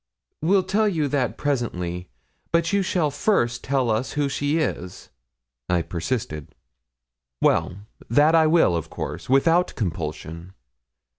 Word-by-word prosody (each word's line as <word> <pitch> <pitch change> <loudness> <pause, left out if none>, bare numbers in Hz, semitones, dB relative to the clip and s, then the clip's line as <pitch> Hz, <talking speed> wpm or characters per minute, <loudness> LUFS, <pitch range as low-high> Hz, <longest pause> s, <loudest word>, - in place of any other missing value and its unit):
'We'll 185 +4 +3
tell 215 +3 +2
you 160 -6 0
that 130 -3 -1
presently, 90 -11 -2 0.4
but 170 +2 +1
you 200 - +3
shall 175 -5 0
first 130 - +1
tell 130 -4 +1
us 110 +4 -1
who 145 -1 0
she 145 +2 0
is,' 90 - -3 0.6
I 90 -2 +2
persisted. 85 - -4 0.8
'Well, 90 - +2 0.3
that 145 +7 +4
I 160 -1 +5
will, 160 - +4
of 80 - -3
course, - - -6
without 165 +7 +3
compulsion. 85 -1 -5
135 Hz, 130 wpm, -24 LUFS, -, 0.8 s, I